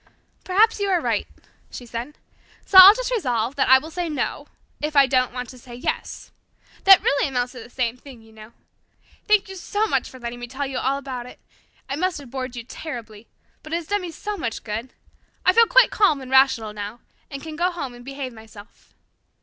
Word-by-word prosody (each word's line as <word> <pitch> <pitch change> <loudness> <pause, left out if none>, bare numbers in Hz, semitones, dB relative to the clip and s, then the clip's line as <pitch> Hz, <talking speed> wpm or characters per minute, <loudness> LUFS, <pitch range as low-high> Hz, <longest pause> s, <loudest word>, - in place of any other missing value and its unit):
"Perhaps 425 +4 +3
you 400 0 -1
are 365 -2 +2
right," - - -1 0.4
she 245 - -9
said. 240 +5 -7 0.5
"So 380 - +7
I'll 385 +3 +11
just - - -3
resolve 250 - -1
that 280 - +1
I 260 - +9
will 315 +5 -7
say 350 0 -3
'no' 300 - -3 0.3
if 300 0 -3
I 280 -1 +7
don't 255 -1 +1
want 250 0 -6
to 255 - -12
say 240 0 -12
'yes.' 250 - -5 0.5
That 390 -1 +8
really 280 +1 +2
amounts 250 -2 -2
to 250 - -10
the 235 - -11
same 245 -1 -2
thing, 250 -3 -14
you 225 - -19
know. 215 +1 -13 0.8
Thank 425 -2 +3
you 385 - -9
so 410 +4 -1
much - - -1
for 260 - -13
letting 240 0 -6
me 245 - -7
tell 270 +3 -4
you 265 -1 -4
all 270 +2 0
about 255 -3 -6
it. - - -14 0.5
It 275 +2 -4
must 370 0 0
have 275 -5 -11
bored 255 -2 -5
you 235 - -6
terribly, 230 -5 -9 0.3
but 310 - -9
it - - +2
has 340 -1 -3
done 410 +4 -1
me 360 - -6
so 415 +6 -6
much 230 - -4
good. 225 +4 -5 0.5
I 370 - +5
feel 460 +2 +6
quite - - +5
calm 395 -9 +3
and 260 -1 -10
rational 265 -5 +3
now, 210 +3 -7 0.3
and 275 -1 -8
can 315 -1 -7
go 350 +3 +1
home 305 -8 -6
and 245 0 -13
behave 270 -1 -6
myself. 220 -1 -16
270 Hz, 220 wpm, -22 LUFS, 240-345 Hz, 0.8 s, I'll